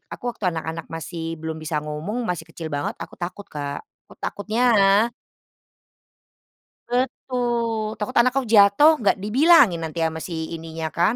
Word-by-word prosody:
aku - - -15
waktu 215 - -9
anak-anak 160 0 -5
masih 165 +1 -5
belum 160 0 -4
bisa 155 0 -3
ngomong, 165 +11 -4
masih 175 -3 -2
kecil 165 0 -7
banget, 145 0 -2
aku - - -10
takut 180 +3 -5
Kak. 145 - -5 0.2
Kut - - -16
takutnya 215 +3 -3 2.3
Betul! 240 -3 -1
Takut 210 - -4
anakku 255 +3 +4
jatuh, 205 +8 +7 0.2
gak 195 - +5
dibilangin 255 - +5
nanti 160 +1 -5
sama 160 0 -2
si 175 - -6 0.2
ininya 160 0 -5
kan, 175 +7 +3
185 Hz, 140 wpm, -23 LUFS, 160-235 Hz, 2.3 s, jatuh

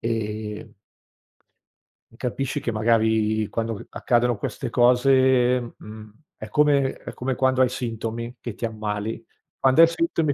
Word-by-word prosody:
ehm 110 -2 -4 1.4
e - - -19
capisci 125 +2 -3
che, 120 - -2
magari, 110 -1 +1
quando, 115 0 -2
uhm, 100 - -9
accadono 120 -1 +1
queste 120 +5 -4
cose, 125 0 +3
mhmm, 105 0 -11 0.3
è 110 - -8
come 140 +1 +3
è - - -10
come 130 +1 -3
quando 130 0 +2
hai 130 - +5
sintomi, 115 -1 -5
che 120 - -6
ti - - -11
ammali. 110 0 -4 0.4
Quando 135 +4 +5
hai 165 - +9
sintomi, 165 -2 0
120 Hz, 140 wpm, -23 LUFS, 110-130 Hz, 1.4 s, hai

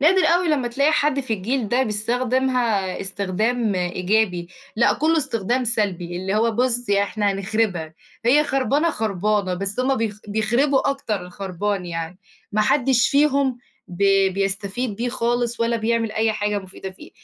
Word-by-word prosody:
نادر 365 +6 +4
أوي 350 0 +3
لمّا 275 -6 +1
تلاقي 280 +6 +2
حد 290 -2 +2
في 250 -4 -4
الجيل 220 +4 -2
ده 250 +5 +2
بيستخدمها 235 -2 0
استخدام 205 +4 -1
إيجابي. 180 0 0 0.3
لأ، 235 - +4
كلّه 320 +3 +1
استخدام 250 -4 0
سلبي، 190 -6 -1
اللي 190 +2 -2
هو 225 +2 +2
بُص، 245 0 0
إحنا 200 0 +1
هنخربها، 195 -5 -1 0.3
هي 285 +6 +5
خربانة، 280 +4 +1
خربانة، 210 - 0
بس 195 +5 -2
هُم 265 +1 +2
بيخ 215 -3 -2
بيخربوا 240 +7 +2
أكتر 230 -7 -3
الخربان 190 +1 -3
يعني. 165 +1 -5 0.3
ما 215 - +2
حدش 245 +2 +3
فيهم 280 -3 +2 0.3
ب 175 - -10 0.4
بيستفيد 200 +3 -2
بيه 240 +3 -2
خالص 240 -1 -1
ولا 230 0 +1
بيعمل 225 0 0
أي 220 0 +1
حاجة 210 -1 -1
مفيدة 190 0 -8
فيه، 185 - -14
220 Hz, 150 wpm, -22 LUFS, 195-255 Hz, 0.4 s, هي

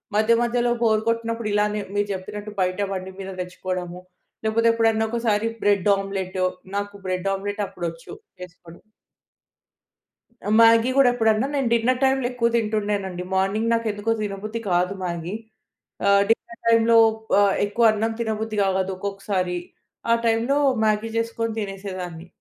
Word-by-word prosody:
మధ్య 215 +2 +4
మధ్యలో 240 0 +1
బోర్ 220 -2 +3
కొట్టినప్పుడు. 230 -1 -1
ఇలానే 210 0 +1 0.2
మీరు 205 0 +1
చెప్పినట్టు 205 +3 -6
బయట 185 +1 0
బండి 190 0 -5
మీద 195 0 -6
తెచ్చుకోవడము. 180 -1 -5 0.4
లేకపోతే 225 +1 +2
ఎప్పుడన్నా 225 -1 +2
ఒకసారి 225 -2 0
బ్రెడ్ 205 -1 +2
ఆమ్లెట్. 195 -1 -4 0.4
నాకు 205 0 -4
బ్రెడ్ 185 +1 -1
ఆమ్లెట్ 205 +2 -3
అప్పుడు 175 - -6
వచ్చు 165 0 -12 0.3
చేసుకోడం. 170 -1 -12 1.8
మ్యాగీ 230 +1 +6
గూడా 270 -2 +6
ఎప్పుడన్నా, 225 +1 +2
నేను 270 -3 +1
డిన్నర్ 250 +3 +1
టైమ్‌లో 265 -1 +2
ఎక్కువ 245 -2 +1
తింటుండేనండి. 205 -5 -1
మార్నింగ్ 205 +4 +1
నాకు 230 0 0
ఎందుకో 205 +2 -2
తినబుద్ధి 210 +2 -4
కాదు 180 +2 +1
మ్యాగీ 170 0 -4 0.7
ఆహ్, 200 0 +5
డిన్నర్ 235 +1 -1
టైమ్‌లో 230 0 +5 0.4
ఆహ్, 200 -1 +4
ఎక్కువ 220 +3 +1
అన్నం 220 +1 -1
తినబుద్ధి 220 -1 -2
కావదు 190 0 0
ఒక్కొక్కసారి. 195 -2 -2 0.5
ఆ - - +7
టైమ్‌లో 230 +5 +2 0.3
మ్యాగీ 215 +1 +1
చేసుకొని 230 0 -2
తినేసేదాన్ని. 185 -4 -6
210 Hz, 135 wpm, -23 LUFS, 190-230 Hz, 1.8 s, ఆ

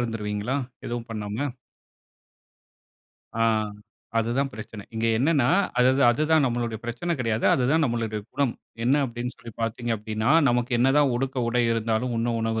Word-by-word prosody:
இருந்துருவீங்களா? 115 +1 -2 0.3
எதுவும் 120 0 -4
பண்ணாம? 105 0 -4 2.0
ஆ - - +4 0.8
அதுதான் 120 +5 0
பிரச்சனை. 105 -1 -8
இங்க 115 +1 0
என்னன்னா, 140 -1 +3 0.3
அது 125 +1 +5
தான், 135 -3 +6
அதுதான் 155 +3 +3
நம்மளுடைய 120 -2 -2
பிரச்சனை 120 +9 -2
கிடையாது. 115 -1 -1
அது 130 - +1
தான் 160 +1 +3
நம்முடைய 115 -4 -1
குணம். 140 -4 +1 0.3
என்ன 135 +4 +3
அப்பிடின்னு 120 0 -5
சொல்லி 115 -2 -11
பார்த்தீங்க 115 +1 -2
அப்பிடின்னா, 110 +2 -2 0.2
நமக்கு 120 +1 0
என்னதான் 135 +2 +4
உடுக்க 135 +2 -2
உடை 120 +1 +2
இருந்தாலும், 115 +2 0
உண்ண 115 +1 0
உணவு 115 0 -1
120 Hz, 145 wpm, -25 LUFS, 115-130 Hz, 2.0 s, தான்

